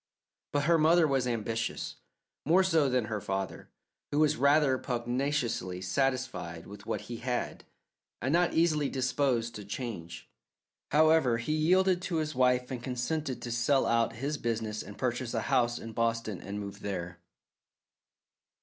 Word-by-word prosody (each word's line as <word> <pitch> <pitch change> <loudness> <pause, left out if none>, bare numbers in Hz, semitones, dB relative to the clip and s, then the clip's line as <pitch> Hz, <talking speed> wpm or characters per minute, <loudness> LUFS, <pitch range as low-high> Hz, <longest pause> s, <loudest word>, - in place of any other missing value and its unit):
But 145 0 +1
her 165 +3 +4
mother 160 +1 +5
was 135 -3 +1
ambitious, 115 -1 -2 0.5
more 175 +6 +4
so 160 -7 +3
than 125 -3 +1
her 110 -1 -3
father, 95 +1 -4 0.4
who 145 - -2
was 155 -1 +4
rather 140 0 +4
pugnaciously 120 -6 -1
satisfied 95 -7 -1
with 100 +1 -11
what - - -2
he 120 - -7
had, 125 +1 -3 0.5
and 130 +4 -1
not 175 0 +2
easily 155 -4 +3
disposed 130 -3 0
to 105 - -7
change. 100 -6 -6 0.6
However, 155 -5 +4
he 120 +7 -2
yielded 180 +4 +3
to 180 -1 -3
his 155 -1 -1
wife 125 0 +2
and 125 -2 -4
consented 130 +3 -3
to 120 - -4
sell 120 +4 +2
out 115 0 +2
his 140 +6 -3
business 110 -2 -2
and 105 +2 -10
purchase 120 -1 -2
a 115 - +1
house 120 -2 +1
in 115 0 -8
Boston 115 -3 -1
and 100 +1 -5
move 100 -1 -7
there. 90 -3 -5
125 Hz, 150 wpm, -30 LUFS, 115-145 Hz, 0.6 s, mother